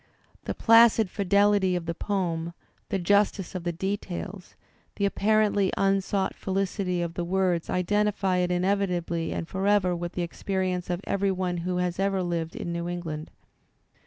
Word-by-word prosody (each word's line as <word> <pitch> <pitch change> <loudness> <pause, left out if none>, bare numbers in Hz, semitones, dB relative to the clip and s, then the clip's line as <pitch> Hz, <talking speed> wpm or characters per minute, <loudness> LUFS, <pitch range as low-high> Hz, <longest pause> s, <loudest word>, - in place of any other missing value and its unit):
The - - -3
placid 230 -3 +5
fidelity 200 -1 +3
of 175 -2 -3
the 170 - -2
poem, 170 -3 -2 0.4
the 195 - 0
justice 200 0 +1
of 185 -2 -5
the 175 - +1
details, 190 +1 -5 0.4
the 200 - 0
apparently 205 -1 +2
unsought 195 0 +1
felicity 190 -2 -1
of 170 -1 -4
the 175 - -3
words 180 -1 0
identify 195 0 +1
it 180 0 +1
inevitably 180 -3 0
and 165 - -3
forever 190 -1 +1
with 175 0 -5
the 180 - -2
experience 185 +1 -2
of 175 +1 -2
every 200 0 0
one 180 -1 -2
who 180 +1 -2
has 180 0 -1
lived 175 -4 -1
in 170 - -4
New 170 0 -3
England. 165 -3 -5
185 Hz, 150 wpm, -27 LUFS, 175-200 Hz, 0.4 s, placid